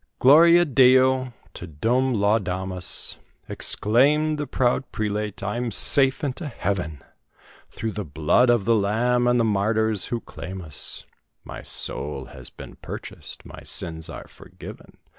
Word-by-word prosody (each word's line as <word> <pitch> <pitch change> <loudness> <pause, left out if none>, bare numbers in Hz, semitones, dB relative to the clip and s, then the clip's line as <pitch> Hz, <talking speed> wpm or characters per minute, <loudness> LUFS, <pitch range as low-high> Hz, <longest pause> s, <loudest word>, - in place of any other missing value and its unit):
"Gloria 170 +6 +6
Deo! 130 -2 +4 0.2
Te 90 - -8
Deum 120 - 0
laudamus!" 95 -3 -1 0.3
Exclaimed 150 +8 +1
the 145 - -3
proud 130 +1 0
prelate, 105 -2 -3
"I'm 120 +4 -2
safe 135 +5 +2
into 145 +3 -3
Heaven; 90 - -4 0.7
Through 110 - -4
the 105 0 -4
blood 80 - +2
of 120 -5 +2
the 115 - +3
Lamb, 120 +4 +1
and 120 0 +3
the - - +3
martyrs 110 0 0
who 120 - -3
claim 90 0 -8
us, 80 -3 -4 0.4
My - - -9
soul 70 -2 -2
has - - -8
been - - -12
purchased, - - -9
my - - -11
sins 80 -1 -3
are - - -9
forgiven! - - -13
115 Hz, 135 wpm, -23 LUFS, 95-130 Hz, 0.7 s, Gloria